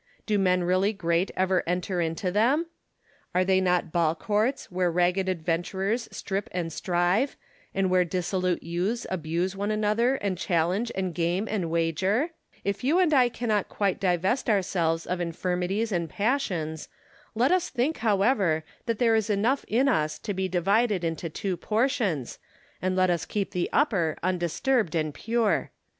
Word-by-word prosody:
Do 210 Hz, -2 st, +1 dB
men 180 Hz, -2 st, +2 dB
really 185 Hz, +4 st, +2 dB
great 170 Hz, -1 st, 0 dB
ever 185 Hz, -1 st, +2 dB
enter 180 Hz, +1 st, -1 dB
into 165 Hz, +3 st, -1 dB
them? 250 Hz, -, +2 dB, 0.7 s
Are 185 Hz, 0 st, +3 dB
they 190 Hz, 0 st, +3 dB
not 180 Hz, -2 st, +1 dB
ball 165 Hz, -1 st, +2 dB
courts, 215 Hz, -, -1 dB
where 180 Hz, 0 st, +1 dB
ragged 180 Hz, +2 st, +1 dB
adventurers 185 Hz, +6 st, -1 dB
strip 195 Hz, +1 st, -3 dB
and 170 Hz, -3 st, -3 dB
strive, 180 Hz, -, +1 dB, 0.4 s
and 195 Hz, -1 st, +2 dB
where 185 Hz, 0 st, +3 dB
dissolute 180 Hz, 0 st, -1 dB
youths 180 Hz, +8 st, -2 dB
abuse 175 Hz, +2 st, -1 dB
one 200 Hz, +1 st, -2 dB
another, 215 Hz, +4 st, +2 dB
and 195 Hz, -7 st, -2 dB
challenge 185 Hz, +8 st, 0 dB
and 185 Hz, -2 st, -2 dB
game 175 Hz, +5 st, 0 dB
and 190 Hz, -7 st, -2 dB
wager 170 Hz, +6 st, +1 dB
1 320 Hz, -, -2 dB, 0.3 s
If 200 Hz, +2 st, -2 dB
you 295 Hz, +7 st, +3 dB
and 355 Hz, -4 st, +3 dB
I 255 Hz, -3 st, +5 dB
cannot 220 Hz, -4 st, -1 dB
quite 200 Hz, -2 st, 0 dB
divest 190 Hz, +7 st, +1 dB
ourselves 175 Hz, -5 st, +1 dB
of 180 Hz, 0 st, -2 dB
infirmities 180 Hz, +5 st, -1 dB
and 170 Hz, -3 st, -1 dB
passions, 180 Hz, -, -1 dB, 0.5 s
let 245 Hz, +5 st, +3 dB
us 365 Hz, -1 st, +2 dB
think 270 Hz, +5 st, 0 dB
however 200 Hz, -6 st, +2 dB, 0.2 s
that 230 Hz, -2 st, 0 dB
there 230 Hz, -1 st, +3 dB
is 220 Hz, -1 st, +1 dB
enough 220 Hz, +7 st, +1 dB
in 250 Hz, +5 st, +2 dB
us 155 Hz, -, +1 dB
to 205 Hz, -, -4 dB
be 190 Hz, 0 st, -1 dB
divided 195 Hz, +2 st, +1 dB
into 165 Hz, 0 st, -2 dB
two 185 Hz, +4 st, -3 dB
portions, 210 Hz, -, -1 dB, 0.4 s
and 185 Hz, 0 st, 0 dB
let 185 Hz, -1 st, +3 dB
us 170 Hz, -, 0 dB
keep 200 Hz, -2 st, -3 dB
the 180 Hz, -3 st, -1 dB
upper 195 Hz, -, +1 dB
undisturbed 185 Hz, +3 st, 0 dB
and 155 Hz, -2 st, 0 dB
pure. 230 Hz, +2 st, 0 dB
190 Hz, 160 wpm, -27 LUFS, 175-220 Hz, 0.7 s, I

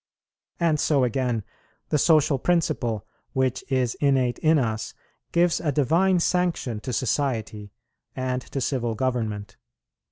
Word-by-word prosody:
And 165 Hz, -3 st, +2 dB
so 140 Hz, -3 st, +2 dB
again, 125 Hz, -2 st, 0 dB, 0.5 s
the 150 Hz, -, +2 dB
social 150 Hz, -3 st, +4 dB
principle, 120 Hz, -, 0 dB, 0.3 s
which 130 Hz, -2 st, 0 dB
is 125 Hz, -3 st, +1 dB
innate 130 Hz, -4 st, +2 dB
in 160 Hz, 0 st, +4 dB
us, 110 Hz, -5 st, -2 dB, 0.4 s
gives 170 Hz, 0 st, +3 dB
a 150 Hz, -, 0 dB
divine 170 Hz, +7 st, +3 dB
sanction 170 Hz, -10 st, 0 dB
to 125 Hz, -, -5 dB
society 115 Hz, -5 st, -2 dB, 0.4 s
and 130 Hz, -1 st, -2 dB
to 135 Hz, -, -5 dB
civil 120 Hz, -3 st, -1 dB
government. 110 Hz, -5 st, -2 dB
130 Hz, 125 wpm, -25 LUFS, 120-155 Hz, 0.5 s, social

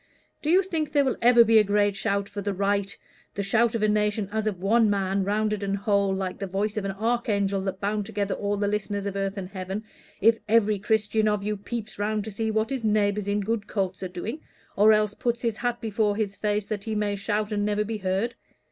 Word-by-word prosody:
Do 305 Hz, -, -2 dB
you 370 Hz, +4 st, +5 dB
think 315 Hz, -5 st, -2 dB
there 285 Hz, -2 st, +4 dB
will 240 Hz, -2 st, +5 dB
be 225 Hz, -1 st, +5 dB
a -, -, +5 dB
great 205 Hz, 0 st, +2 dB
shout 200 Hz, 0 st, -1 dB
for 205 Hz, 0 st, -6 dB
the 200 Hz, 0 st, -2 dB
right 200 Hz, 0 st, 0 dB, 0.4 s
the 200 Hz, -, -2 dB
shout 230 Hz, +3 st, +2 dB
of 220 Hz, -, -1 dB
a -, -, +4 dB
nation 210 Hz, -1 st, +1 dB
as 220 Hz, 0 st, -1 dB
of 205 Hz, -4 st, -1 dB
one 220 Hz, +3 st, +3 dB
man, 195 Hz, -1 st, 0 dB
rounded 210 Hz, +1 st, 0 dB
and 200 Hz, 0 st, -1 dB
whole, 200 Hz, -1 st, +1 dB
like 190 Hz, -1 st, -3 dB
the 195 Hz, -, -3 dB
voice 200 Hz, +3 st, -1 dB
of 215 Hz, -, -1 dB
the 195 Hz, 0 st, -3 dB
archangel 205 Hz, -3 st, 0 dB
that 190 Hz, 0 st, -4 dB
bound 205 Hz, 0 st, -1 dB
together 205 Hz, -2 st, -2 dB
all 205 Hz, 0 st, -2 dB
the 205 Hz, 0 st, 0 dB
listeners 205 Hz, -1 st, -2 dB
of 200 Hz, -1 st, -3 dB
earth 195 Hz, 0 st, -2 dB
and 185 Hz, -2 st, -5 dB
heaven 190 Hz, +2 st, -5 dB, 0.4 s
if 225 Hz, +2 st, +4 dB
every 215 Hz, -2 st, +3 dB
Christian 215 Hz, +1 st, +1 dB
of 210 Hz, -1 st, 0 dB
you 210 Hz, +1 st, -1 dB
peeps 215 Hz, +1 st, -6 dB
round 210 Hz, 0 st, 0 dB
to 220 Hz, -, -6 dB
see 220 Hz, +2 st, -2 dB
what 220 Hz, +2 st, 0 dB
his 265 Hz, -3 st, -2 dB
neighbors 210 Hz, -1 st, +1 dB
in 205 Hz, +1 st, +1 dB
good 210 Hz, 0 st, -2 dB
coats 190 Hz, -3 st, -2 dB
are 185 Hz, -, -2 dB
doing, 215 Hz, -, -6 dB, 0.3 s
or 210 Hz, +2 st, +6 dB
else 210 Hz, -1 st, +3 dB
puts 235 Hz, +2 st, -2 dB
his 230 Hz, -2 st, 0 dB
hat 240 Hz, 0 st, -1 dB
before 215 Hz, -2 st, 0 dB
his 205 Hz, -2 st, -2 dB
face 210 Hz, -1 st, -1 dB
that 205 Hz, -1 st, -4 dB
he 220 Hz, -1 st, -2 dB
may 210 Hz, -1 st, 0 dB
shout 210 Hz, +2 st, -2 dB
and 205 Hz, -1 st, 0 dB
never 210 Hz, 0 st, +1 dB
be 215 Hz, 0 st, -4 dB
heard? 195 Hz, +5 st, -1 dB
210 Hz, 235 wpm, -26 LUFS, 200-220 Hz, 0.4 s, or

